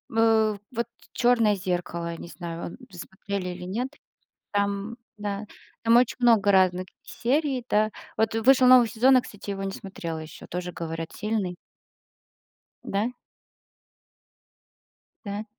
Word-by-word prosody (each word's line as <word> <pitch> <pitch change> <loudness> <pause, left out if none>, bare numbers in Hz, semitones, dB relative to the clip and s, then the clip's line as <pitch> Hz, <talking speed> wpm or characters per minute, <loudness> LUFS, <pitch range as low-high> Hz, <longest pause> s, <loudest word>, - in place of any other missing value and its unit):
э, 220 -2 +4
вот 235 -1 -2 0.2
"Черное 235 -4 +3
зеркало", 175 -3 -3
я 165 - -6
не - - -8
знаю, 170 -1 -6
вы 185 - -14
смотрели 190 +1 -5
или 180 0 -7
нет. 230 +8 -2 0.6
Там 200 +2 -1 0.2
да, 205 0 -3 0.4
там 230 +1 +5
очень 245 0 +3
много 225 -5 +5
разных 185 -1 +3 0.2
серий, 265 0 -1
да. 215 +1 +3 0.3
Вот 220 0 +1
вышел 255 +3 +5
новый 250 -2 +8
сезон, 255 +4 +5
я - - +6
кстати 205 -4 -9
его 195 -1 -3
не 195 - -3
смотрела 170 -5 -6
еще, 155 -1 -10
тоже 180 0 -4
говорят 165 -1 -5
сильный. 210 -4 -2 1.3
Да? 205 +4 0 2.2
Да. 205 +1 -4
205 Hz, 130 wpm, -26 LUFS, 180-230 Hz, 2.2 s, новый